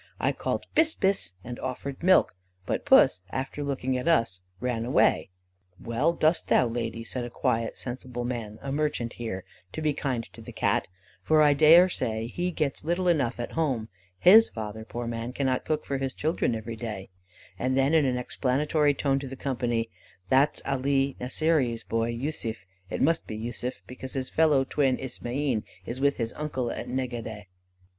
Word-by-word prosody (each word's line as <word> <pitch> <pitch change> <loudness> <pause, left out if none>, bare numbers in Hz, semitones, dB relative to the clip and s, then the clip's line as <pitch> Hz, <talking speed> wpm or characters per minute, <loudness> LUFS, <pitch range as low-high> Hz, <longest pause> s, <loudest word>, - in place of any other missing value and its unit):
I - - +2
called - - -3
'bis! 320 0 +4
bis!' 190 - +1
and 120 0 -7
offered 130 +1 -5
milk; 185 +2 +5 0.3
but - - -2
puss, 90 - +6
after 135 +5 -4
looking 130 -2 -1
at 125 - -5
us, 115 - +2 0.2
ran 120 -1 -1
away. 120 -4 +3 0.5
"'Well, 130 +9 +1
dost 160 0 +2
thou, 125 - +4
Lady,' 115 -1 -3
said 125 +2 -4
a 120 - -5
quiet 115 -1 -1
sensible 125 -1 -5
man, 115 -4 -4
a 135 - -3
merchant 145 -5 -1
here, 110 -6 -5 0.3
'to - - -5
be 150 -1 +2
kind 130 -5 -2
to - - -11
the - - -9
Cat, - - 0 0.3
for 155 -1 +4
I 145 -1 +6
daresay 155 -7 +5
he 175 +9 -2
gets 155 -5 -2
little 175 +3 0
enough 140 -9 +1
at 120 - -4
home; 130 -9 -1 0.3
his 215 - +7
father, 110 0 -6
poor 120 +2 -5
man, 115 +1 -4
cannot 130 -1 0
cook 155 -1 -1
for 135 -1 -2
his 135 -1 -2
children 155 -6 0
every 115 +1 -5
day;' 110 -4 -6 0.5
and 130 +2 0
then 135 +3 +3
in 160 -2 +5
an 130 -2 +1
explanatory 145 +4 +1
tone 135 0 +1
to 135 - -6
the 135 - -7
company: 120 -4 -1 0.4
'That's 140 +3 +3
Alee 135 0 +1
Nasseeree's 130 -3 0
boy, 115 0 -1
Yussuf; 115 -4 -4 0.2
it - - -1
must 165 +4 +2
be 110 - -5
Yussuf, 120 +3 -5
because 130 +1 -8
his 130 -1 -3
fellow 155 -4 +4
twin, 135 -1 +1
Ismaeen, 130 -1 -2 0.2
is 125 +5 -5
with 140 0 +3
his 115 -1 -3
uncle 130 -5 -3
at - - -5
Negadeh. 120 -5 -4
130 Hz, 175 wpm, -27 LUFS, 115-145 Hz, 0.5 s, his